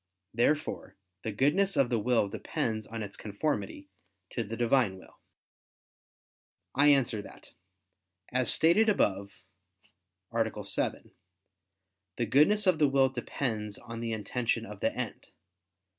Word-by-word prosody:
Therefore 145 +7 0 0.3
the 110 - -3
goodness 150 - +2
of 130 -3 +3
the 115 - +2
will 115 -1 +2
depends 110 +2 -3
on 115 -1 -5
its 100 - -7
conformity 100 -3 -3 0.4
to 120 - -2
the 115 +2 -6
Divine 120 -5 +2
will. 95 - -17 1.5
I 145 +2 +4
answer 135 -7 +3
that, - - -14 0.8
As 130 0 +2
stated 195 +8 +4
above 100 - 0 0.9
(A. 110 -2 -1
7), 100 - 0 1.1
the 120 - 0
goodness 155 - +4
of 185 -4 +3
the 150 -2 +4
will 135 -1 +3
depends 115 -4 -3
on 115 -1 -8
the 115 0 -3
intention 115 +2 -1
of - - -10
the - - +1
end. - - -4
120 Hz, 130 wpm, -29 LUFS, 105-140 Hz, 1.5 s, I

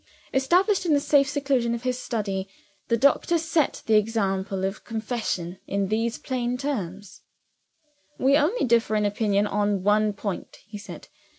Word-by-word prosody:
Established 360 +10 +3
in 325 -4 +3
the - - +3
safe 280 -1 +3
seclusion 270 -5 0
of 235 - -7
his 255 -1 -1
study, 195 -6 -3 0.4
the 230 - +2
doctor 280 +7 +3
set 320 -2 0
the 220 -1 +4
example 195 -3 0
of 195 +2 -4
confession 215 -6 -3
in 200 -1 -1
these 225 +2 0
plain 250 -1 -2
terms: 205 -8 -5 1.0
"We 270 +2 +4
only 315 - +2
differ 230 -2 +2
in 210 -1 +2
opinion 205 0 +1
on 205 -2 0
one 210 +1 +3
point," 200 -1 -5
he 210 -1 -9
said. 205 - -10
225 Hz, 155 wpm, -25 LUFS, 205-265 Hz, 1.0 s, the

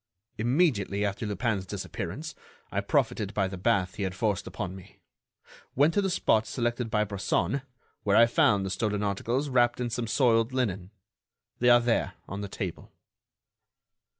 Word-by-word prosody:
"Immediately 115 - +1
after 100 +2 -3
Lupin's 105 -1 -1
disappearance, - - -5 0.4
I - - 0
profited 105 -2 0
by 95 -2 +2
the 95 - -6
bath 95 +1 0
he - - -4
had 95 -1 -2
forced 105 0 -1
upon 95 -3 -5
me, 95 -2 -14 0.8
went 145 +5 +4
to 205 - +2
the 195 - 0
spot 110 -11 +2
selected 120 -1 -2
by 105 -2 +2
Bresson, 105 +6 -1 0.4
where 100 0 +2
I 115 - +8
found 105 -4 +3
the 95 - -3
stolen 105 +1 -1
articles 115 +7 -1
wrapped 120 -2 +2
in 120 -1 -2
some 120 0 -2
soiled 115 0 +2
linen. 100 -8 -1 0.7
They 125 - +4
are 120 0 +8
there, 120 -1 0
on 100 +2 -5
the 100 - -4
table." 95 -3 -6
110 Hz, 160 wpm, -28 LUFS, 100-120 Hz, 0.8 s, I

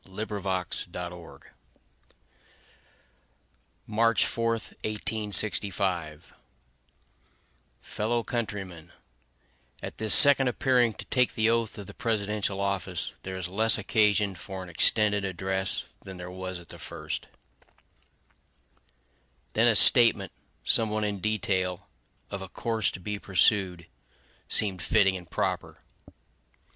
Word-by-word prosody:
Lincoln's 100 +1 -7 0.3
Second - - -8
Inaugural 90 -1 -8
Address - - -21 2.3
March 115 0 +2
4, 115 0 -2
1865 100 -7 0 1.5
Fellow 115 +2 -3
countrymen: 95 -8 -6 0.9
At - - -8
this 110 -1 +7
second 140 -2 +8
appearing 125 -3 +1
to - - -10
take 125 -1 0
the 110 +1 +2
oath 115 -1 -2
of 100 - -8
the - - -11
presidential 105 -3 -3
office, 100 -3 -2
there 95 0 -7
is 90 -1 -5
less 110 +5 +2
occasion 105 -1 +1
for 95 +1 -9
an 90 - -11
extended 105 +4 +1
address 95 +1 -2 0.2
than 95 -1 -10
there 90 0 -9
was 95 0 -7
at 85 -2 -15
the - - -10
first. 75 -1 -7 2.3
Then 115 +2 +3
a 115 - +4
statement, 115 -6 +5 0.3
somewhat 110 -1 +3
in 105 -1 -3
detail, 95 -2 -2 0.4
of 100 - -5
a 95 - -8
course 115 +2 -2
to - - -8
be 105 +3 -5
pursued, 95 -3 +1 0.6
seemed 95 -5 +2
fitting 95 +4 +2
and 90 -3 -10
proper. - - -3
100 Hz, 115 wpm, -26 LUFS, 95-110 Hz, 2.3 s, second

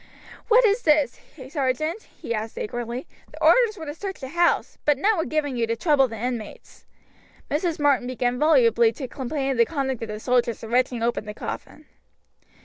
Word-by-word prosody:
"What 480 +2 +6
is 425 +2 +3
this, 300 - +2 0.3
sergeant?" 305 - -2
he 235 - -4
asked 220 0 -4
angrily. 240 +3 -4 0.3
"The 310 +1 -8
orders 435 +5 +5
were 320 - -7
to 295 - -5
search 385 +4 -6
the 265 - -7
house, 345 +3 +1
but 295 -2 +3
none 420 +9 +2
were 325 - -1
given 295 -4 -1
you 230 -1 0
to 230 - 0
trouble 275 +1 +3
the 225 -2 -8
inmates." 235 -1 -6 0.6
Mrs. 320 +3 0
Martin 285 -4 +2
began 250 -1 -1
volubly 235 -7 +4
to 265 0 -6
complain 270 +2 -3
of 260 - -2
the 235 - +5
conduct 270 -6 -2
of 225 - -4
the 215 0 -6
soldiers 245 -1 0
in 225 - -7
wrenching 245 -1 +1
open 235 -2 -1
the 210 0 -7
coffin. - - -7
265 Hz, 190 wpm, -24 LUFS, 235-310 Hz, 0.6 s, What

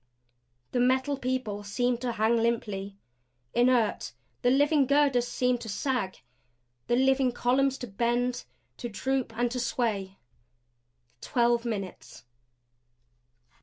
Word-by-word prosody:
The 245 - 0
Metal 260 +3 +2
People 255 -6 -3
seemed 240 +4 -1
to 245 -2 -2
hang 220 +2 +2
limply, 210 -4 -1 0.6
inert; 240 -3 +2 0.3
the 245 - +3
living 285 +1 +3
girders 275 -3 +3
seemed 250 -1 0
to 225 - -7
sag; 220 - -2 0.6
the 240 - +2
living 265 0 +3
columns 265 +3 +1
to 245 - -6
bend; 240 +4 -1 0.3
to 240 - -5
droop 265 +3 -2
and 240 0 +1
to 250 - -2
sway. 220 -5 -2 1.0
Twelve 240 -1 +1
minutes. 200 -5 -6
245 Hz, 115 wpm, -28 LUFS, 230-260 Hz, 1.0 s, the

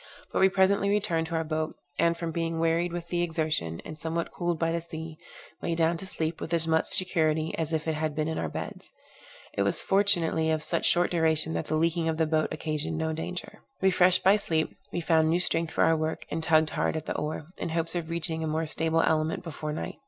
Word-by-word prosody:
But - - +1
we 190 - +6
presently 195 +1 +3
returned 195 -6 +1
to 165 - -4
our 165 - +1
boat, 155 0 -2 0.2
and 170 0 +3
from 165 -1 -3
being 165 0 -2
wearied 165 +1 +1
with 170 0 -5
the 175 0 0
exertion, 155 - -1
and 155 0 -8
somewhat 165 +2 -2
cooled 175 -1 -1
by 165 0 0
the 170 0 -1
sea, 160 -1 -8 0.4
lay 170 - -1
down 165 0 +2
to 190 - -6
sleep 160 -2 -2
with 170 - -1
as 165 -1 +2
much 160 0 +2
security 160 -4 +1
as 160 -1 -2
if 160 0 -1
it 160 - +1
had 155 -1 -2
been 155 0 0
in 160 - -2
our 80 - -2
beds. - - -7 0.6
It - - -1
was 100 0 0
fortunately 175 -5 +2
of 155 -1 0
such 170 - 0
short 175 +1 +3
duration 160 - +2
that 80 - -2
the 155 - 0
leaking 165 +1 +1
of 160 - -1
the 160 - +2
boat 155 0 +1
occasioned 155 0 -2
no 160 0 -1
danger. 175 +3 -6 0.2
Refreshed 185 -1 +4
by 195 +3 +6
sleep, 160 -6 -1 0.2
we 175 - -2
found 160 -1 +3
new 170 +2 +3
strength 165 -2 0
for - - +2
our 165 - +4
work, 155 0 -2
and 160 - -1
tugged 160 -1 +3
hard - - 0
at 155 - -5
the - - -3
oar, 150 +1 -4
in 170 - -3
hopes 165 0 -1
of 170 -2 -3
reaching 160 -1 -1
a - - -1
more 160 +1 -1
stable 160 +1 +1
element 160 +1 +1
before 155 -2 -5
night. 150 - -5
160 Hz, 235 wpm, -28 LUFS, 155-170 Hz, 0.6 s, we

